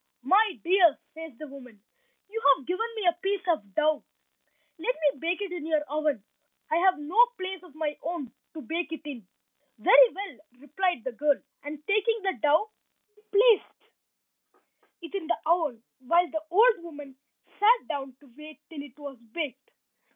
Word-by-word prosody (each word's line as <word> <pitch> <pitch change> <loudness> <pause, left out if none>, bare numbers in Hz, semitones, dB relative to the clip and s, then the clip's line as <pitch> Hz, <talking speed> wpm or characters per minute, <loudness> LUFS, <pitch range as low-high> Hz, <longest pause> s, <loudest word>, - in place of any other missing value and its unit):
"My 410 -1 +3
dear," 350 -3 +5 0.2
says 320 -5 -10
the 305 - -8
woman, 255 -6 -13 0.5
"you 450 +3 -5 0.2
have 270 - -14
given 370 +6 -1
me 430 -3 -3
a 345 0 +2
piece 390 0 -1
of 205 - -1
dough, 305 0 +2 0.8
let - - -1
me 290 -3 0
bake 345 +6 -1
it 390 - -6
in 340 -3 -5
your 310 -2 +2
oven, 295 -5 -1 0.4
for 315 - 0
I - - +3
have 375 +1 +4
no 335 +11 +4
place 375 -1 -5
of 355 -5 -17
my 305 -2 -2
own 320 -7 -4 0.2
to 310 - -7
bake 330 +6 -3
it 320 - -6
in." 250 -10 -8 0.5
"Very - - +7
well," 400 +1 -7 0.2
replied 295 +1 -2
the 260 - -3
girl, 290 +3 +1 0.2
and, 295 +1 -8
taking 430 +2 +2
the 385 -1 +1
dough, 315 +8 +3 0.4
she 420 - -27
placed 430 0 +3 1.1
it 330 - -9
in 380 -5 -4
the 345 - +1
oven, 310 -9 +1 0.2
while 340 +7 +3
the 315 - -2
old 420 +2 +5
woman 290 -5 -10 0.4
sat 465 +4 +4
down 270 -2 -5
to 270 -5 -20
wait 305 0 -12
till 300 -3 -6
it 280 -2 -13
was 280 -4 -9
baked. 270 +3 -6
320 Hz, 175 wpm, -27 LUFS, 290-380 Hz, 1.1 s, Very